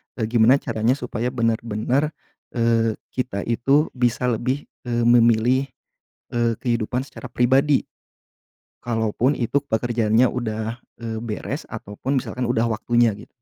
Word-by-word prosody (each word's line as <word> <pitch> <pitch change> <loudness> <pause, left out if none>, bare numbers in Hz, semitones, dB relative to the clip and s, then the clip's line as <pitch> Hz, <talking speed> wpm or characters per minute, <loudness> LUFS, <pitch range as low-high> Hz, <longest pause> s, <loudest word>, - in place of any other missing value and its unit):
e - - -6
gimana 120 +4 +5
caranya 115 0 +1
supaya 125 -2 -3
benar-benar, 115 +5 0 0.4
eee, 115 -2 +2 0.2
kita 125 -6 -3
itu 135 +6 +2
bisa 125 0 +1
lebih, 125 +4 -2 0.2
eee, 120 -1 0
memilih, 120 +2 +4 0.7
eee, 120 -1 +2
kehidupan 120 +1 -1
secara 130 - -10
pribadi? 130 +4 +3 0.9
Kalaupun 120 +3 0
itu 140 +4 -1
pekerjaannya 115 0 +2
udah, 110 -1 -3 0.2
eee, 110 -1 -3
beres 120 +5 -5
ataupun 120 +5 -3
misalkan 125 0 -3
udah 115 -1 +1
waktunya 120 +1 +2
git 105 - -13
120 Hz, 120 wpm, -22 LUFS, 115-130 Hz, 0.9 s, gimana